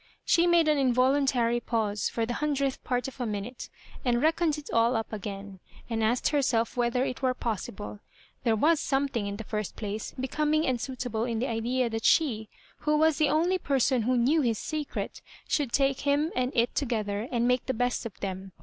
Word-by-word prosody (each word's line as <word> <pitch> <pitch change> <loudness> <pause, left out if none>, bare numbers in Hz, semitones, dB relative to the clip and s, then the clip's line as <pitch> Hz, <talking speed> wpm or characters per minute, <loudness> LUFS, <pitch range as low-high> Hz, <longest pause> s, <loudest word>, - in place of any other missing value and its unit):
She 340 +1 +4
made 340 -2 +4
an 300 -2 +3
involuntary 255 -2 +2
pause 215 -4 -1
for 230 - -1
the 240 - -3
hundredth 280 -3 0
part 250 0 -1
of 265 -1 -8
a 245 - -1
minute, 215 +4 -5 0.3
and 240 -3 +2
reckoned 320 +1 +2
it 300 - -8
all 230 +2 +3
up 225 0 -3
again, 200 -2 -6 0.3
and 225 -1 0
asked 235 +3 +2
herself 260 -6 +1
whether 245 +1 +1
it 255 - -4
were 255 -1 +1
pos 225 -5 -2
sible. 205 +1 -8 0.4
There 230 -2 +3
was 310 +8 +3
something, 270 -6 0
in 200 - -3
the 225 - -6
first 210 -1 -4
place, 210 0 -5
becoming 300 +4 +1
and 250 -3 0
suitable 245 -4 -3
in 235 -2 -2
the 240 - 0
idea 240 +2 0
that 225 0 -3
she, 220 -9 +2 0.3
who 300 0 +1
was 315 0 +3
the 305 -2 +4
only 350 +4 +2
person 265 -4 +2
who 250 +3 +1
knew 280 +7 +3
his 230 -5 +1
secret, 305 +3 -4 0.3
should 285 -6 0
take 275 0 +2
him 290 +3 +1
and 255 0 0
it 235 0 +2
together 220 -5 -1
and 240 -1 +1
make 250 0 +1
the 260 - +1
best 245 +2 0
of 215 - -15
them. 190 -1 -5
250 Hz, 200 wpm, -28 LUFS, 225-280 Hz, 0.4 s, She